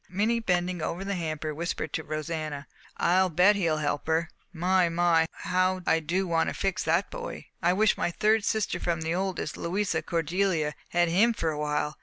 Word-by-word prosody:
Minnie, 215 Hz, +6 st, +1 dB
bending 180 Hz, -4 st, 0 dB
over 180 Hz, +5 st, -3 dB
the 200 Hz, -, -2 dB
hamper, 155 Hz, -3 st, -3 dB
whispered 170 Hz, +3 st, -3 dB
to 160 Hz, -, -2 dB
Rosanna, 155 Hz, -1 st, -4 dB, 0.3 s
"I'll 185 Hz, +2 st, +3 dB
bet 180 Hz, +5 st, +5 dB
he'll 165 Hz, -6 st, +1 dB
help 145 Hz, -1 st, -2 dB
her! 165 Hz, +1 st, +1 dB, 0.2 s
My, 180 Hz, +1 st, +2 dB
my, 165 Hz, -1 st, +3 dB, 0.2 s
how 185 Hz, 0 st, +1 dB
I 165 Hz, -, +3 dB
do 175 Hz, +5 st, -1 dB
want 165 Hz, -1 st, +1 dB
to -, -, -5 dB
fix 195 Hz, -1 st, -1 dB
that 165 Hz, +4 st, +1 dB
boy! -, -, -6 dB, 0.2 s
I 175 Hz, +1 st, +3 dB
wish 215 Hz, +2 st, +2 dB
my -, -, +1 dB
third 215 Hz, +4 st, +2 dB
sister 220 Hz, 0 st, 0 dB
from 170 Hz, -2 st, -1 dB
the 160 Hz, +1 st, -1 dB
oldest, 190 Hz, +1 st, -2 dB
Louisa 190 Hz, +4 st, -1 dB
Cordelia, 170 Hz, -2 st, 0 dB, 0.2 s
had 175 Hz, -1 st, +2 dB
him 215 Hz, +8 st, +4 dB
for 165 Hz, -5 st, -1 dB
a 150 Hz, -, -5 dB
while. 150 Hz, 0 st, -2 dB
175 Hz, 190 wpm, -27 LUFS, 160-190 Hz, 0.3 s, bet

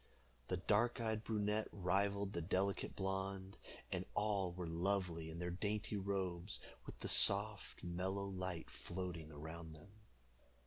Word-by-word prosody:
The 90 Hz, -, 0 dB
dark 110 Hz, +7 st, +2 dB
eyed 110 Hz, -1 st, 0 dB
brunette 105 Hz, -1 st, 0 dB
rivaled 100 Hz, +2 st, +1 dB
the 85 Hz, -, -1 dB
delicate 95 Hz, +3 st, 0 dB
blonde, 95 Hz, 0 st, -2 dB, 0.4 s
and -, -, 0 dB
all 100 Hz, -3 st, +1 dB
were 90 Hz, 0 st, -4 dB
lovely 85 Hz, -1 st, 0 dB
in 80 Hz, -, -6 dB
their 90 Hz, +1 st, -2 dB
dainty 105 Hz, +3 st, -1 dB
robes, 95 Hz, -2 st, -1 dB, 0.3 s
with -, -, -8 dB
the -, -, -2 dB
soft 100 Hz, +1 st, +6 dB
mellow 95 Hz, +3 st, -1 dB
light 95 Hz, -3 st, -4 dB
floating 85 Hz, -3 st, -5 dB
around 80 Hz, +2 st, -7 dB
them. 80 Hz, +5 st, -13 dB
95 Hz, 135 wpm, -40 LUFS, 85-100 Hz, 0.4 s, soft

